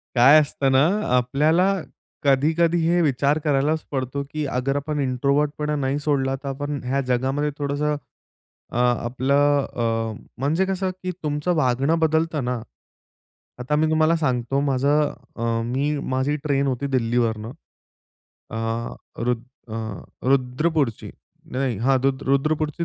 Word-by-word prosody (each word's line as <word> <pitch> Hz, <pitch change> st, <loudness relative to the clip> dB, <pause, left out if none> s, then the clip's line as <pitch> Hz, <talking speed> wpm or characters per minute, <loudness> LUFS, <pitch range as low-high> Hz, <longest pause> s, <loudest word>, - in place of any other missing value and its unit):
काय 135 Hz, +5 st, +8 dB
असतं 140 Hz, -2 st, 0 dB
ना, 130 Hz, +2 st, +5 dB
अ, 210 Hz, +4 st, 0 dB
आपल्याला 155 Hz, +10 st, +3 dB, 0.5 s
कधी-कधी 160 Hz, +5 st, +3 dB
हे 175 Hz, +1 st, +3 dB
विचार 140 Hz, -1 st, +2 dB
करायलाच 150 Hz, +2 st, +1 dB
पडतो, 135 Hz, 0 st, -2 dB
की 155 Hz, -1 st, -2 dB
अगर 135 Hz, +1 st, -1 dB
आपण 150 Hz, +1 st, -3 dB
इंट्रोव्हर्टपणा 145 Hz, +3 st, 0 dB
नाही 140 Hz, 0 st, -1 dB
सोडला, 140 Hz, -2 st, 0 dB
तर 140 Hz, +1 st, -9 dB
आपण 145 Hz, +1 st, -3 dB
ह्या 135 Hz, +2 st, 0 dB
जगामध्ये 135 Hz, +4 st, 0 dB
थोडंसं 145 Hz, +1 st, -1 dB, 0.8 s
अ, -, -, -3 dB
आपलं 130 Hz, +4 st, +2 dB
अ, 115 Hz, -1 st, -1 dB, 0.3 s
म्हणजे 155 Hz, +8 st, +1 dB
कसं, 190 Hz, 0 st, -1 dB
की 185 Hz, -, -1 dB
तुमचं 150 Hz, +3 st, 0 dB
वागणं 140 Hz, +2 st, +2 dB
बदलतं 160 Hz, -2 st, +1 dB
ना. 125 Hz, -1 st, -2 dB, 1.0 s
आता 125 Hz, +4 st, -1 dB
मी 155 Hz, +1 st, +2 dB
तुम्हाला 160 Hz, +1 st, +3 dB
सांगतो 135 Hz, -4 st, 0 dB
माझं 140 Hz, +2 st, +2 dB, 0.2 s
अ, -, -, -7 dB, 0.2 s
मी, 140 Hz, +5 st, 0 dB, 0.2 s
माझी 130 Hz, +3 st, +1 dB
ट्रेन 140 Hz, -2 st, +1 dB
होती 130 Hz, +1 st, -1 dB
दिल्लीवरनं. 115 Hz, -2 st, 0 dB, 1.0 s
अ, -, -, -5 dB, 0.7 s
रुद्र 120 Hz, -1 st, 0 dB, 0.3 s
अ, -, -, -2 dB, 0.5 s
रुद्रपूरची 135 Hz, 0 st, +1 dB, 0.4 s
नाही, 130 Hz, -3 st, -1 dB
हां 130 Hz, +4 st, +3 dB
रुद्रपूरची 140 Hz, +4 st, 0 dB
140 Hz, 130 wpm, -23 LUFS, 130-150 Hz, 1.0 s, काय